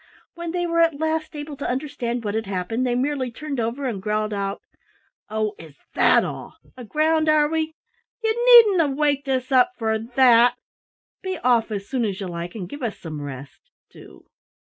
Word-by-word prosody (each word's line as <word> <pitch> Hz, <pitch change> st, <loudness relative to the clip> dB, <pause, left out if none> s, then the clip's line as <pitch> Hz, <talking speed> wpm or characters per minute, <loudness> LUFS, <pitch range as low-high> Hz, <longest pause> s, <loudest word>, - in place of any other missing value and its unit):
When 340 Hz, 0 st, -6 dB
they 350 Hz, +1 st, -1 dB
were 335 Hz, -1 st, 0 dB
at 330 Hz, -3 st, +3 dB
last 315 Hz, 0 st, -2 dB
able 295 Hz, 0 st, -6 dB
to 280 Hz, -, -4 dB
understand 250 Hz, -3 st, -3 dB
what 205 Hz, -, -2 dB
had 220 Hz, -1 st, -2 dB
happened, 200 Hz, +6 st, -2 dB
they 245 Hz, -, 0 dB
merely 265 Hz, 0 st, -1 dB
turned 285 Hz, +2 st, -5 dB
over 235 Hz, +5 st, -2 dB
and 220 Hz, -7 st, -3 dB
growled 215 Hz, +1 st, -1 dB
out: 200 Hz, 0 st, -3 dB, 0.7 s
"Oh, 215 Hz, 0 st, -1 dB
is 160 Hz, -3 st, -13 dB, 0.2 s
that -, -, +4 dB
all? -, -, -7 dB, 0.2 s
Aground, 310 Hz, +6 st, +1 dB
are 305 Hz, -1 st, +4 dB
we? 320 Hz, 0 st, -2 dB, 0.5 s
Ye 445 Hz, -, +2 dB
needn't 470 Hz, -6 st, +7 dB
have 280 Hz, -3 st, -1 dB
waked 285 Hz, -2 st, 0 dB
us 260 Hz, 0 st, -1 dB
up 260 Hz, +8 st, +4 dB
for 220 Hz, -1 st, 0 dB
that! 240 Hz, 0 st, +4 dB, 0.7 s
Be 375 Hz, -1 st, -4 dB
off 235 Hz, -2 st, +3 dB
as 200 Hz, -2 st, -5 dB
soon 260 Hz, -3 st, -1 dB
as 195 Hz, -3 st, -3 dB
ye 195 Hz, -, -4 dB
like 175 Hz, +1 st, -6 dB
and 190 Hz, -5 st, -5 dB
give 285 Hz, +10 st, -9 dB
us 230 Hz, -4 st, -3 dB
some 155 Hz, -3 st, -7 dB
rest 140 Hz, -1 st, -9 dB, 0.2 s
do!" -, -, -15 dB
255 Hz, 190 wpm, -23 LUFS, 215-305 Hz, 0.7 s, needn't